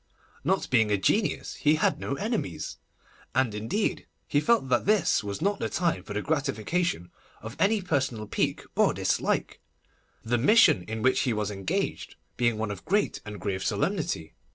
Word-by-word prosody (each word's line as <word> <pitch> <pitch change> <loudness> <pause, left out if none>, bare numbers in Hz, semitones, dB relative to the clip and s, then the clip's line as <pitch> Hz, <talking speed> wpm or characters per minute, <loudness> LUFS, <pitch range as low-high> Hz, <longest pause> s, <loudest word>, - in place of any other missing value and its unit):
Not - - +1
being 110 -4 +4
a 105 - +2
genius, 200 - 0
he 150 0 +3
had 160 -2 +1
no 140 - -3
enemies, 210 - -3 0.6
and 130 -5 +2
indeed 110 - -2 0.2
he 145 - +2
felt 230 - +2
that 120 +7 +1
this 210 - +3
was 100 -1 -4
not 200 +1 +1
the - - -2
time 170 -3 0
for 105 - -8
the 105 - -2
gratification 145 - -1 0.3
of 110 +1 -8
any 205 0 +2
personal 130 -10 -1
pique - - -1
or - - +3
dislike, - - 0 0.7
the 120 +1 +1
mission 210 - +6
in 110 0 -4
which 130 0 +3
he 125 - +1
was 105 -1 -2
engaged 95 -2 -3 0.2
being 120 -2 +1
one 110 -1 -2
of 95 -2 -7
great 205 +5 0
and 105 -1 -7
grave 95 -2 -2
solemnity. 145 - -1
130 Hz, 170 wpm, -27 LUFS, -, 0.7 s, mission